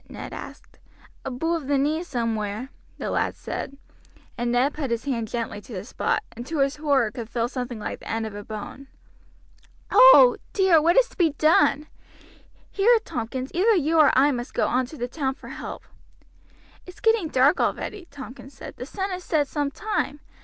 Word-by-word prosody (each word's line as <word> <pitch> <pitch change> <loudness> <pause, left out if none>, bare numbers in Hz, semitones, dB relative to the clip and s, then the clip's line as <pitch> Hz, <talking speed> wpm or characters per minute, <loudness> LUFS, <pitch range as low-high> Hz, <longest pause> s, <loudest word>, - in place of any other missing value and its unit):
Ned - - -8
asked. - - -10 0.4
"Aboove 300 +3 -2
the 285 0 +2
knee 300 +4 +1
somewhere," 230 - -3 0.3
the - - -4
lad - - 0
said, 275 - -6 0.6
and 240 -1 -1
Ned 255 +4 +2
put 285 -4 -4
his 235 +2 -2
hand 235 -5 -2
gently 225 -2 -4
to 230 - -12
the 185 -1 -5
spot, 425 - -1
and 235 - -8
to 320 - -3
his 275 +1 +1
horror 280 -7 +2
could 230 0 -7
feel 235 0 -1
something 245 -2 -5
like 210 - -5
the - - -11
end 225 0 -1
of 220 - -6
a 205 0 -7
bone. 215 +6 -8 1.0
"Oh! - - +8 0.2
dear, 380 -5 +5
what 340 +3 +3
is - - +6
to - - -20
be 330 -5 +3
done? 300 -1 +3 0.9
Here, 460 +4 +4
Tompkins, 255 +3 -4
either 420 +6 +3
you 325 -1 +2
or 305 - +7
I 280 +2 +5
must 245 -1 -5
go - - +2
on 255 0 0
to 310 - -11
the 245 - -3
town 265 0 -2
for - - -12
help." - - -7 1.0
"It's 365 - -12
getting 450 -6 +2
dark 275 +2 +3
already," 385 -5 -2
Tompkins 260 -1 -11
said; - - -10
"the 250 - -7
sun 385 +4 -3
has 365 0 -5
set 300 -5 +1
some 290 0 -1
time. 300 -2 -3
275 Hz, 190 wpm, -24 LUFS, 240-325 Hz, 1.0 s, Oh